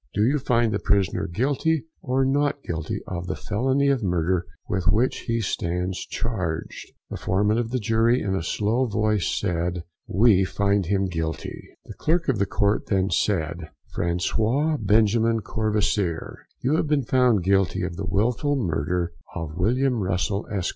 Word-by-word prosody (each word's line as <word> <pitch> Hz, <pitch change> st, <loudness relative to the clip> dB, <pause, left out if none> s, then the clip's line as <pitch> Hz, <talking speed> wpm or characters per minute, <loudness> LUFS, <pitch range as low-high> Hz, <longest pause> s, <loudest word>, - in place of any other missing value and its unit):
Do 105 Hz, -, +3 dB
you 140 Hz, +6 st, +2 dB
find 120 Hz, -3 st, +2 dB
the 100 Hz, -, 0 dB
prisoner 100 Hz, 0 st, +1 dB
Guilty 140 Hz, -, 0 dB, 0.2 s
or 135 Hz, 0 st, +1 dB
Not 145 Hz, +1 st, +1 dB
Guilty 80 Hz, -2 st, -4 dB
of 90 Hz, -1 st, -5 dB
the -, -, -2 dB
felony 130 Hz, +7 st, 0 dB
of 135 Hz, -3 st, +2 dB
murder 90 Hz, -1 st, 0 dB, 0.2 s
with 95 Hz, -3 st, -2 dB
which 115 Hz, +9 st, +1 dB
he 115 Hz, -1 st, 0 dB
stands 90 Hz, -1 st, -2 dB
charged?" 90 Hz, -9 st, -4 dB, 0.2 s
The -, -, -3 dB
foreman 105 Hz, +4 st, +1 dB
of 115 Hz, -1 st, -2 dB
the 130 Hz, -, -1 dB
jury, 115 Hz, +2 st, +2 dB
in 95 Hz, -, -2 dB
a 95 Hz, -, 0 dB, 0.2 s
low 115 Hz, +5 st, +2 dB
voice, 105 Hz, -4 st, +1 dB
said 85 Hz, 0 st, -1 dB, 0.2 s
"We 100 Hz, -1 st, +4 dB
find 100 Hz, 0 st, 0 dB
him 100 Hz, 0 st, +1 dB
GUILTY!" 80 Hz, -3 st, -5 dB
The -, -, -9 dB
Clerk 165 Hz, 0 st, 0 dB
of 120 Hz, -6 st, +1 dB
the 100 Hz, -, +1 dB
Court 100 Hz, +2 st, +1 dB
then 95 Hz, -1 st, +1 dB
said: 85 Hz, -4 st, 0 dB, 0.3 s
François 110 Hz, -, 0 dB
Benjamin 110 Hz, +2 st, +3 dB
Courvoisier, 105 Hz, -6 st, -1 dB
you 140 Hz, +5 st, +2 dB
have 155 Hz, -, 0 dB
been 145 Hz, -2 st, +2 dB
found 125 Hz, -7 st, +3 dB
Guilty 95 Hz, -1 st, +2 dB
of 90 Hz, -1 st, -3 dB
the 95 Hz, +1 st, -5 dB
wilful 120 Hz, +9 st, +1 dB
murder 85 Hz, -, -1 dB, 0.2 s
of 80 Hz, -3 st, -5 dB
William 120 Hz, +6 st, +1 dB
Russell, 95 Hz, +2 st, -1 dB
Esq. 95 Hz, -3 st, -1 dB
105 Hz, 160 wpm, -24 LUFS, 90-120 Hz, 0.3 s, We